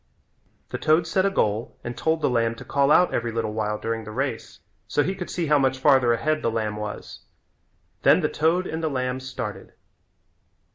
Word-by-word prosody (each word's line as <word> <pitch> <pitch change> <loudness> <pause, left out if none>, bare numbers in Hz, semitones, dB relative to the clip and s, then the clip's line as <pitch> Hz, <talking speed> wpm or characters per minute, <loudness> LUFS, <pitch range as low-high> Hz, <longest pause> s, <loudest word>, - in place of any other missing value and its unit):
The - - -4
toad 160 +2 +3
set 190 +4 +1
a - - +2
goal 110 - -1
and 120 0 -5
told 160 0 0
the - - +3
lamb 115 -1 +1
to - - -11
call 140 0 +2
out 180 +3 +5
every 120 0 -1
little 110 -1 -2
while 105 -1 -1
during 115 +1 -3
the 105 - -9
race 125 +1 -4 0.3
so 145 - +1
he 190 - -1
could 185 -2 -6
see 175 - -2
how 150 -1 +4
much 130 -1 +1
farther 130 -3 +4
ahead 155 +7 0
the 115 - +1
lamb 110 -2 -2
was. 105 0 -6 0.8
Then - - +5
the - - +2
toad 165 +4 +1
and 160 -1 -4
the 160 - 0
lamb 130 -2 -2
started. 130 0 -6
130 Hz, 200 wpm, -24 LUFS, 115-155 Hz, 0.8 s, out